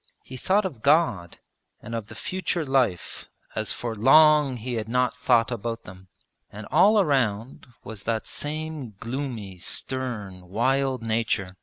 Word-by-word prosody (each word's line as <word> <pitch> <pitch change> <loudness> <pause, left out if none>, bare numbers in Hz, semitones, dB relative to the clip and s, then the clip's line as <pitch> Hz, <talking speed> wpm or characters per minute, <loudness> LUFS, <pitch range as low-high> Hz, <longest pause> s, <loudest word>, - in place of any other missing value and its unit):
He 130 - -10
thought 195 +10 +1
of 135 -12 -5
God 140 - +2 0.4
and 115 - -9
of 115 -2 -4
the 110 - -11
future 180 +4 -2
life 130 -10 0 0.3
as 110 0 -2
for 120 -2 -4
long 145 +3 +5
he 120 +2 -5
had 110 -1 -3
not 125 0 +1
thought 125 -2 +2
about 115 0 -4
them. 95 +1 -13 0.4
And 105 +1 -8
all 210 +2 +5
around 130 - 0 0.2
was 105 -2 -8
that 110 +2 -2
same 150 -6 -5
gloomy 115 -7 -5
stern 105 -6 -4
wild 130 +4 0
nature. 110 -4 -1
120 Hz, 145 wpm, -25 LUFS, 110-135 Hz, 0.4 s, long